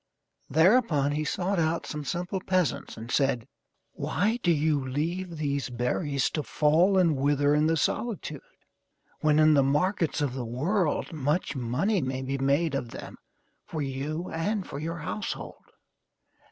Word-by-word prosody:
Thereupon 160 - +4
he 150 +1 -1
sought 190 +3 -1
out 165 +1 0
some 150 -1 -5
simple 180 +5 -3
peasants 185 -7 -1
and 115 +2 -7
said: 135 -5 +1 0.4
"Why 220 +5 -1
do 175 - +3
you 150 -2 +2
leave 165 +6 -3
these 140 -3 -1
berries 125 +4 -1
to 155 - -1
fall 160 +7 +3
and 170 -5 +4
wither 145 +1 +2
in 150 +1 +3
the 165 0 +2
solitude, 170 - -2 0.8
when 150 -1 +3
in 155 0 +6
the 140 - +5
markets 155 +5 +1
of 145 -4 0
the 130 -1 -4
world 150 - -1
much 150 +3 -1
money 135 - 0
may 130 0 -3
be 135 +1 -2
made 140 +4 +2
of 135 -4 -2
them - - -9 0.5
for 155 -2 -4
you 145 +6 -3
and 190 +5 -1
for 140 - -6
your 165 +3 -4
household? 175 +6 -5
150 Hz, 155 wpm, -27 LUFS, 140-175 Hz, 0.8 s, in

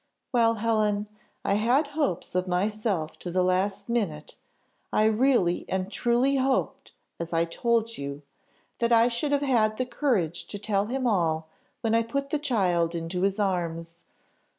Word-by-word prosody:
Well, 230 -2 +4
Helen, 215 -2 +1 0.4
I - - +2
had 245 +8 +2
hopes 285 - -2
of 185 +1 0
myself 190 -2 -1
to 180 - -5
the 180 +1 +1
last 185 +2 0
minute; 200 -11 -2 0.6
I 215 - +3
really 220 -5 +3
and 190 +1 -2
truly 245 +4 +2
hoped, 265 0 -1 0.3
as 170 0 -5
I 165 0 +2
told 230 +6 0
you, 140 +1 -6 0.6
that 235 0 +1
I 230 +1 +5
should 245 +5 -2
have 285 0 +2
had 220 -5 +2
courage 215 - 0
to 205 - -5
tell 205 0 0
him 255 +2 -2
all 165 -7 +1 0.3
when 225 -2 0
I 230 - +4
put 275 +5 -3
the 300 - +1
child 180 - +1
into 170 +2 -3
his 195 +1 +1
arms. 170 -4 -2
210 Hz, 155 wpm, -27 LUFS, 180-235 Hz, 0.6 s, I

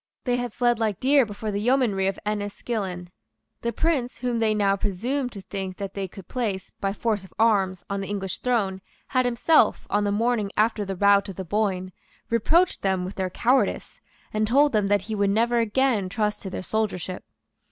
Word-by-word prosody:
They 245 -1 +1
had 245 -1 -3
fled 240 0 +1
like 215 -4 0
deer 275 -2 +4
before 210 +1 -4
the 200 0 -2
yeomanry 225 -6 +2
of 195 - -1
Enniskillen. 205 -3 -3 0.5
The 235 - -1
Prince 275 -4 0
whom 245 -2 -1
they 220 -1 +2
now 200 -1 +3
presumed 245 +8 -2
to 200 - -8
think 190 0 -5
that 200 -1 -5
they 195 -1 -3
could 185 0 -12
place, 210 -7 -3
by 195 - 0
force 210 -1 -1
of 190 - -14
arms, 195 -5 +2
on 200 0 -2
the 195 - -5
English 195 -2 -3
throne, 200 -7 0 0.3
had 255 -1 +2
himself, 245 +1 +3
on 205 +1 +2
the 205 - +1
morning 215 -1 +1
after 215 0 +2
the 195 0 -4
rout 200 +1 +4
of 190 - -7
the 190 - -5
Boyne, 185 -1 -1 0.4
reproached 330 +11 +3
them 190 -2 0
with 185 - -6
their 190 -1 -2
cowardice, 250 +8 0 0.3
and 215 0 +1
told 285 +5 +4
them 210 -3 +2
that 205 -1 +2
he 220 - -5
would 200 -1 +1
never 235 +3 +2
again 230 -3 +1
trust 210 +1 -1
to 195 - -5
their 185 - -5
soldiership. 190 -4 -2
210 Hz, 195 wpm, -25 LUFS, 195-235 Hz, 0.5 s, deer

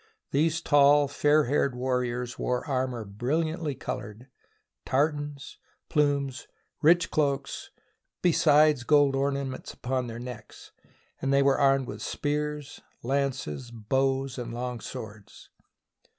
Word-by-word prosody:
These 160 +4 +1
tall, 145 -1 +5
fair 150 +2 +3
haired 140 0 +1
warriors 125 -1 -2
wore 125 0 -1
armour 130 -4 -2
bril 120 +11 -1
liantly 160 -3 -4
coloured, 105 +6 -6 0.5
tartans, 145 +1 -1 0.3
plumes, 140 -3 0 0.3
rich 170 +2 +4
cloaks, 140 -2 -1 0.5
besides 150 -5 +4
gold 145 0 +4
ornaments 135 -1 -2
upon 130 0 -2
their 115 0 -6
necks; 120 -2 -9 0.5
and 135 - 0
they 140 0 +4
were 135 -1 +3
armed 135 -1 +3
with 105 -2 -7
spears, 150 +1 -3 0.2
lances, 130 - -2
bows, 130 +3 -1
and 120 -1 -5
long 125 0 -4
swords. 105 -2 -10
135 Hz, 115 wpm, -27 LUFS, 125-145 Hz, 0.5 s, tall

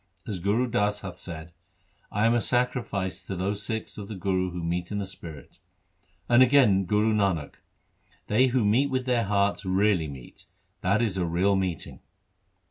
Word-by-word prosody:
As 100 -5 -4
Gur 105 +7 +1
Das 105 -3 0
hath 95 -2 -8
said, 85 -1 -8 0.3
" - - -41 0.3
I 105 +2 +1
am 115 - +4
a 120 - +2
sacrifice 120 -7 -1
to 95 - -3
those 100 +3 -2
Sikhs 110 -1 -4
of 100 - -7
the 110 - -6
Guru 95 0 0
who 90 -1 -6
meet 85 +2 -2
in 105 - -2
the 100 - -2
spirit." 85 -6 -10 0.7
And 120 +1 +5
again 120 -8 +5
Guru 105 +4 +2
Nanak: 95 -8 0 0.4
— - - -36
They 125 +5 +3
who 125 -1 +1
meet 125 +7 +3
with 130 -1 -1
their 120 -3 +1
hearts 100 0 +1
really 95 -3 +2
meet; 65 -4 -11 0.3
that 100 +5 +2
is 100 -5 -1
a 90 - +1
real 90 +4 +2
meeting. 95 -4 -3
100 Hz, 185 wpm, -26 LUFS, 90-110 Hz, 0.7 s, And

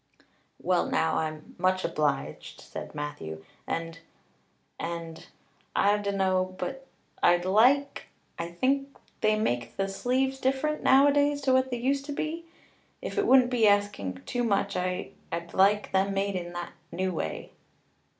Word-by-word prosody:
"Well 180 0 +1
now, 160 0 +1
I'm 155 -1 -4
much 185 0 +2
obliged," 150 -2 -2
said - - -8
Matthew, 80 - -6 0.2
"and 165 0 -3 0.8
and 165 -1 -5 0.5
I 205 +1 +4
dunno 190 -2 0
but 270 +3 -5 0.3
I'd 175 0 +4
like 250 +9 +3 0.3
I 170 0 -3
think 275 +9 0 0.2
they 215 0 +3
make 120 - -1
the 195 0 0
sleeves 260 +6 0
different 270 +4 0
nowadays 285 +1 +4
to 265 -2 +2
what 260 0 +3
they 245 - -2
used 275 +3 0
to 290 - -4
be. 320 +3 -3 0.5
If - - -3
it 405 - +1
wouldn't 255 -1 +6
be 230 -3 +4
asking 200 - +1
too 245 - -1
much 200 -3 +1
I 180 0 -2 0.2
I'd 170 0 -4
like 200 +2 +3
them 195 +1 +1
made 195 0 0
in 175 -1 -4
the 175 0 -5 0.2
new 185 +2 -1
way." 80 - -4
200 Hz, 145 wpm, -28 LUFS, 170-265 Hz, 0.8 s, wouldn't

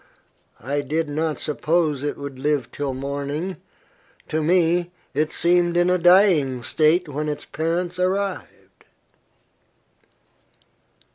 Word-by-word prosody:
I 140 +4 -1
did 155 +3 -2
not 155 +1 -2
suppose 155 -1 0
it 145 0 -3
would 140 -2 -7
live 140 -4 -1
till 140 -2 -3
morning. 140 +6 -4 0.7
To 155 - 0
me, 175 +1 +2 0.2
it 150 +2 0
seemed 175 0 +2
in 175 +1 +3
a 180 - +2
dying 170 - +4
state 160 +6 +2
when 150 +1 -3
its 150 - -5
parents 170 +3 -2
arrived." 190 +1 -3
155 Hz, 115 wpm, -22 LUFS, 145-175 Hz, 0.7 s, dying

